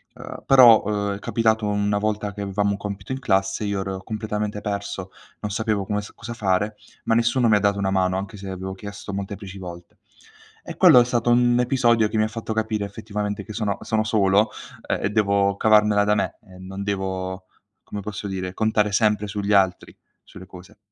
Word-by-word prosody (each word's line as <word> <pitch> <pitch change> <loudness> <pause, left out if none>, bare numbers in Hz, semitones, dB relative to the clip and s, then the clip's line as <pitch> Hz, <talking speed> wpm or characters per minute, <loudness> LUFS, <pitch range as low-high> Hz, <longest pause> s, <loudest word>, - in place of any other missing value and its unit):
uhm, - - -9
però, 125 -5 +7
uhm, 100 -1 -1
è - - -8
capitato 110 0 +1
una 105 0 0
volta 105 -1 -2
che 100 - -7
avevamo 100 +1 0
un 100 - -2
compito 100 +1 -6
in 130 - -4
classe, 95 -5 0
io 100 -1 -1
ero 95 0 -5
completamente 105 -1 -3
perso, 100 -2 -4 0.3
non 105 -1 -4
sapevo 110 -2 -1
come 105 +1 -1
s 105 - -11
cosa 120 +1 -8
fare, 105 -1 0 0.3
ma 115 - +2
nessuno 120 +1 +2
mi 110 - +5
ha 105 - +4
dato 100 0 +1
una 95 -1 0
mano, 95 -1 +1
anche 100 +2 -6
se 95 - -9
avevo 95 0 -5
chiesto 100 0 -8
molteplici 100 0 -6
volte. 85 -2 -10 0.7
E - - -6
quello 125 - +8
è 120 - +4
stato 120 -1 0
un 120 0 +4
episodio 120 -4 +2
che 110 - -2
mi 110 - +3
ha - - +1
fatto 110 0 -6
capire 110 -1 -1
effettivamente 105 0 -5
che 110 - -8
sono 105 -2 -2
sono 110 -1 0
solo, 105 -1 +3 0.4
uhm, - - +1
e 95 - 0
devo 100 -2 +2
cavarmela 105 -1 +4
da 105 0 +2
me - - -2
e 95 -2 -16
non 95 +1 -7
devo, 95 -2 -3 0.4
come 105 - -6
posso 105 0 -6
dire? 95 -1 -4
Contare 105 0 +1
sempre 105 0 +2
sugli 100 0 -2
altri, 95 -2 +1 0.3
sulle 95 -1 -13
cose. 90 0 -14
105 Hz, 200 wpm, -23 LUFS, 95-110 Hz, 0.7 s, quello